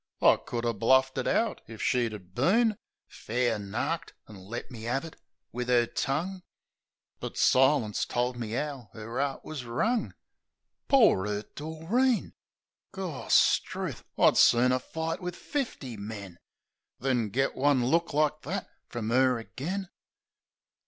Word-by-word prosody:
I - - +7
could 120 -1 -4
'a' 115 - +1
bluffed 130 +5 +3
it - - -2
out 225 -1 +1
if 110 -1 -10
she 125 -2 +2
'ad 95 -5 -9
been 215 - +3 0.3
Fair 120 -1 -1
narked, 120 +11 -3
an' 105 - -12
let 120 +5 -6
me 115 -2 -7
'ave 135 +6 -1
it - - -19 0.4
wiv 125 +1 -4
'er 120 -1 +4
tongue; 170 +11 -2 0.8
But - - -6
silence 130 -5 +3
told 125 +1 -1
me 115 -1 -4
'ow 140 -7 -4
'er 115 +3 -5
'eart 140 -1 -3
wus 155 -4 -5
wrung. 215 - -1 0.7
Poor 220 - +5
'urt 105 0 -4
Doreen! 170 - 0 0.6
Gorstruth! 185 -8 +1
I'd - - +5
sooner 125 +2 +5
fight 160 +6 -4
wiv 180 -1 -4
fifty 225 - -4
men 100 -4 -8 0.6
Than 125 -4 0
git 135 +6 0
one 135 -2 +3
look 165 +6 +2
like 150 +1 +1
that 185 +6 -4 0.2
frum 115 -2 -3
'er 130 0 +4
agen! 175 - -5
130 Hz, 140 wpm, -29 LUFS, 115-160 Hz, 0.8 s, I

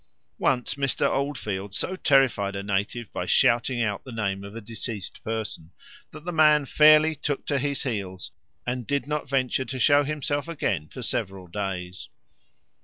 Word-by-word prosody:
Once 125 -2 +1
Mr. 140 -2 +1
Oldfield 105 -9 -2
so 185 - -2
terrified 130 - +3
a 100 - -3
native 100 +3 -2
by - - -3
shouting 120 +1 +3
out 105 -3 -2
the 130 - -9
name 100 -4 -2
of 100 +2 -9
a - - -4
deceased 110 -2 -7
person, 110 -7 -4 0.4
that 150 - -12
the 175 - -2
man 150 -3 +5
fairly 155 +2 +6
took 145 -1 -3
to 140 -2 0
his 140 0 -1
heels 100 -7 -4 0.3
and 125 -1 -3
did 140 -3 0
not 150 -1 -3
venture 130 -1 +1
to 130 - -5
show 145 +4 +5
himself 145 0 -2
again 105 - -2
for 125 - -8
several 95 -5 -3
days. 90 -1 -5
120 Hz, 165 wpm, -26 LUFS, 100-145 Hz, 0.4 s, fairly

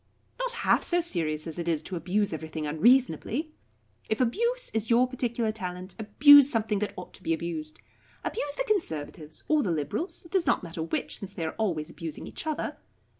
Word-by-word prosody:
"Not - - -1
half - - +4
so 350 - +2
serious 160 - -1
as 165 0 -5
it 170 - -3
is 160 -2 0
to 185 - -5
abuse 190 +3 0
everything 160 0 -5
unreasonably. 240 - +2 0.6
If 220 - 0
abuse 470 - 0
is 220 0 -1
your 245 +2 +5
particular 235 -3 -1
talent, 185 -3 -6
abuse 285 +6 +8
something 220 -5 0
that 210 - -3
ought 180 - -8
to - - -10
be 165 - +1
abused. 160 -2 -5 0.4
Abuse 290 -9 -3
the - - 0
Conservatives 160 - -3
or 310 -1 +3
the 200 - -1
Liberals 170 - -3
it 335 - -15
does 380 -3 +1
not - - +2
matter 165 -2 -6
which, 160 - -2
since 200 -1 -8
they 165 - -3
are 160 - -3
always 165 -8 -1
abusing 165 -2 -6
each - - -7
other. 310 - -2
205 Hz, 190 wpm, -28 LUFS, -, 0.6 s, abuse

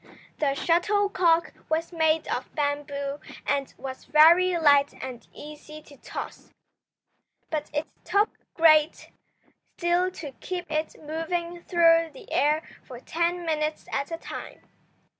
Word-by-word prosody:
The 275 -2 +1
shuttlecock 355 0 +2 0.2
was 325 +2 -1
made 320 -1 +2
of - - -4
bamboo 285 -1 -2 0.3
and 280 -1 -1
was 260 -1 -8
very 340 +5 +6
light 285 -3 +4
and 255 -3 -8
easy 300 +1 -11
to 285 - -16
toss. - - -8 1.0
But 305 -2 -2
it 295 +1 -1 0.2
took 410 +2 +2 0.2
great 315 -1 +4 0.7
skill 350 +1 +2
to 315 -6 -8
keep 355 -3 -5
it 310 0 -2
moving 335 +3 -4
through 330 -2 +4
the - - -12
air 300 +2 +2 0.2
for 250 -3 -11
ten 340 +5 -1
minutes 305 -1 -1
at 280 +1 -2
a 330 - -4
time. - - -9
315 Hz, 125 wpm, -26 LUFS, 295-340 Hz, 1.0 s, very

